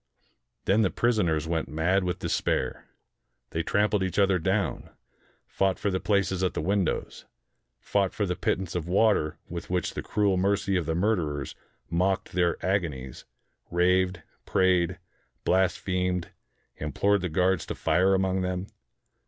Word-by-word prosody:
Then 105 +3 +3
the 100 - +3
prisoners 90 -11 +1
went 80 -1 -1
mad 85 +6 +1
with 90 0 -1
despair. 65 -7 -1 0.6
They 85 - -1
trampled 105 +3 +1
each 95 -2 -2
other 95 -2 +4
down, 95 +2 -1 0.6
fought 95 -1 0
for 100 - -1
the 95 - 0
places 100 -3 +1
at 95 - 0
the - - -1
windows, 95 +1 -1 0.5
fought 100 -2 0
for 105 - -1
the 90 -1 -1
pittance 95 -1 -1
of 85 -2 -3
water 95 -5 +2
with 85 0 -7
which 90 0 -1
the - - -4
cruel 100 -3 +1
mercy 100 +1 +1
of 85 -4 0
the 80 - 0
murderers 85 -8 0 0.3
mocked 95 +3 0
their 85 -1 +1
ago 95 -1 +1
nies, 65 -4 -9 0.4
raved, 90 0 +2 0.2
prayed, 90 -2 +2 0.5
blasphemed, 90 -1 0 0.5
implored 100 +7 +1
the 90 - -2
guards 90 +1 +1
to - - -4
fire 90 +4 +3
among 95 0 +1
them. 90 0 -2
90 Hz, 145 wpm, -27 LUFS, 85-95 Hz, 0.6 s, other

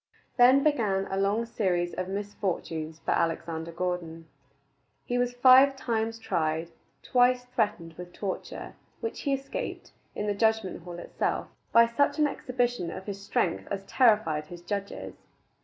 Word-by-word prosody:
Then 255 +3 +6
began 210 -10 +1
a - - 0
long 205 +4 +1
series 180 -6 0
of 185 - -3
misfortunes 185 -5 -3
for - - +1
Alexander 165 0 -1
Gordon. 170 -2 -3 0.8
He 245 0 0
was 245 0 0
five 260 +2 +7
times 225 -3 -1
tried, 165 -5 -1 0.3
twice 250 0 +3
threatened 205 -9 -1
with 180 0 -8
torture 195 0 -5 0.3
which 455 - -4
he 280 - 0
escaped, 460 - -6 0.2
in 210 - -2
the 205 - +1
judgment 220 -4 0
hall 175 -1 -7
itself, - - -2 0.2
by 230 0 +7
such 235 +7 +1
an 305 - +4
exhibition 245 - -1
of 190 - -7
his 200 -1 -5
great 185 -3 0
strength - - -16
as 195 -1 -3
terrified 205 - +3
his 175 +1 -10
judges. 200 +1 -4
205 Hz, 150 wpm, -28 LUFS, 175-245 Hz, 0.8 s, five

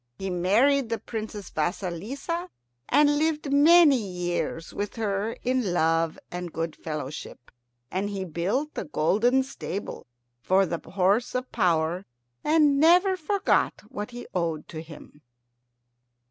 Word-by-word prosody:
He 195 -1 -4
married 225 +9 +3
the 230 - 0
Princess 215 -4 -6
Vasilissa, 210 - -3 0.4
and 290 0 +4
lived 305 -2 0
many 305 0 +7
years 175 -4 -3
with 205 0 -4
her 215 0 -1
in 250 -7 0
love 165 0 +2
and 180 -1 -5
good 165 0 -3
fellowship. 150 -4 -7 0.4
And 195 +3 -1
he 195 -2 -4
built 190 - -1
a - - -3
golden 215 - +2
stable 205 - -6 0.3
for 190 +9 +3
the 170 -1 -4
horse 200 +7 +2
of 255 0 -3
power, 175 -2 +1 0.4
and 300 -3 +4
never 355 +5 +5
forgot 390 +3 0
what 210 +2 -5
he 245 0 -8
owed 165 -4 -2
to 155 - -6
him. 155 -2 -13
205 Hz, 130 wpm, -26 LUFS, 175-275 Hz, 0.4 s, many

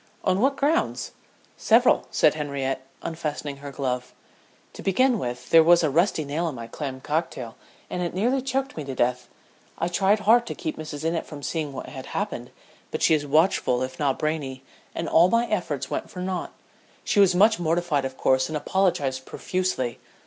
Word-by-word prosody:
"On 185 +2 +2
what 275 +2 +3
grounds?" 300 +5 0 0.5
"Several," 240 +3 +4
said 155 - +4
Henriette, 135 -3 -3 0.2
unfastening 150 -3 -4
her 140 0 -8
glove. 125 -3 -3 0.6
"To - - -9
begin 245 +5 +2
with, 125 -2 -5
there 165 - +9
was 170 +1 +5
a 155 - +2
rusty 165 0 +2
nail 160 +4 -1
in 145 - -7
my 115 -1 -6
clam 130 +2 -6
cocktail, 145 -6 -3 0.3
and 180 - -4
it 175 0 -3
nearly 245 +8 +1
choked 270 +1 -2
me 155 - -4
to 135 -1 -5
death. 125 0 0 0.5
I 170 - -1
tried 195 +4 +2
hard 235 +3 +4
to - - -4
keep 315 - -4
Mrs. 155 -1 -6
Innitt 165 0 -1
from 145 -2 -9
seeing 155 -2 -2
what 135 - -6
had - - -8
happened, - - -3 0.4
but - - -3
she - - +5
is 145 -2 +1
watchful 145 -5 +2
if 130 0 -6
not 140 -3 +1
brainy, 145 -4 -3 0.3
and 165 - -3
all 170 +3 +5
my 230 +3 +3
efforts 150 - -2
went - - -3
for 180 - -9
naught. 185 0 -3 0.5
She 205 - +1
was 190 -3 +5
much 215 +3 +5
mortified 165 -3 +1
of 130 0 -5
course 130 0 +2
and 155 - -2
apologized 145 -7 0
profusely. 180 -10 -2
155 Hz, 185 wpm, -25 LUFS, 135-185 Hz, 0.6 s, there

